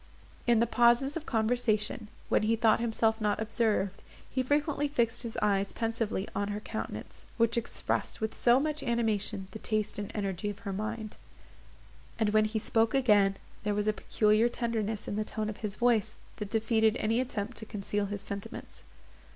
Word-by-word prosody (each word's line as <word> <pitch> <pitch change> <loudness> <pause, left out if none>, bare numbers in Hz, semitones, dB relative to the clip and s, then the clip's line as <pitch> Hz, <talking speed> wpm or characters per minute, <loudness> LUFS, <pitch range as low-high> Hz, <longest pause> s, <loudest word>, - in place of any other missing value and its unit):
In 235 -2 +5
the 235 - +4
pauses 240 +4 +3
of 320 -2 -5
conversation, 220 -2 0 0.2
when - - +3
he 220 +2 +2
thought 220 -1 +4
himself 225 -1 +1
not 210 -1 +1
observed, 215 -3 0 0.3
he 260 - -1
frequently 290 +2 +1
fixed 240 -5 0
his 235 -2 -6
eyes 200 -1 +1
pensively 225 -3 -1
on 200 - 0
her 205 0 -3
countenance, 220 +1 -6
which 230 -1 +3
expressed 235 -1 -2
with 220 0 -2
so 240 +1 +4
much 305 +1 -1
animation 220 -5 0
the 220 - -7
taste 215 -2 -1
and 205 - -4
energy 200 -1 -2
of 205 +2 -8
her 195 - -2
mind; 215 +2 -4 1.0
and 220 -2 +2
when 215 0 +4
he 215 +1 -2
spoke 225 +2 +2
again, 205 -7 +4 0.2
there 210 -1 -1
was 205 0 0
a 215 - +2
peculiar 215 +2 +2
tenderness 225 -3 -2
in 205 - -2
the 215 - +1
tone 215 0 -3
of 205 - -10
his 210 -2 -4
voice, 230 -2 +2 0.2
that 210 -3 -5
defeated 220 0 +2
any 225 +2 +1
attempt 225 -2 -3
to 220 - -6
conceal 205 -1 -2
his 205 0 -4
sentiments. 200 -1 -7
220 Hz, 175 wpm, -30 LUFS, 210-235 Hz, 1.0 s, In